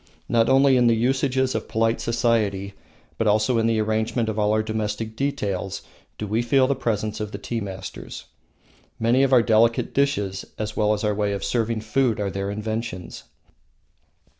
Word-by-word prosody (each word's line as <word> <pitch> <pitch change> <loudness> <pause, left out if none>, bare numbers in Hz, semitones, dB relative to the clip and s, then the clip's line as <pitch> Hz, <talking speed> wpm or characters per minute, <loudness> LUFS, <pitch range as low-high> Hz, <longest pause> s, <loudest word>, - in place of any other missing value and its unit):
Not 115 -1 +2
only 135 0 +5
in 120 -1 +4
the 115 - +4
usages 130 +2 +1
of 110 - -3
polite 115 +1 0
society, 110 -4 0 0.5
but 115 - +1
also 110 +3 +2
in 115 - +2
the 115 -1 +1
arrangement 110 +2 0
of 110 0 -3
all 105 0 +2
our 110 0 +2
domestic 110 0 -3
details, 100 -9 -2 0.3
do 105 - -4
we 110 +3 0
feel 130 +2 +3
the 140 - +1
presence 110 -5 -2
of 105 -1 -4
the 100 - -5
tea 115 +3 -4
masters. 95 -2 -7 0.7
Many 120 +4 +3
of 135 -1 +2
our 125 -3 +6
delicate 115 0 +2
dishes, 105 -9 0
as 110 0 -4
well 105 0 +2
as 105 - -3
our 105 -1 +1
way 105 0 -1
of 100 -1 -4
serving 115 +1 -1
food, 115 +1 0
are 100 -1 -1
their 100 +1 -3
inventions. 105 -3 -5
110 Hz, 180 wpm, -23 LUFS, 105-120 Hz, 0.7 s, our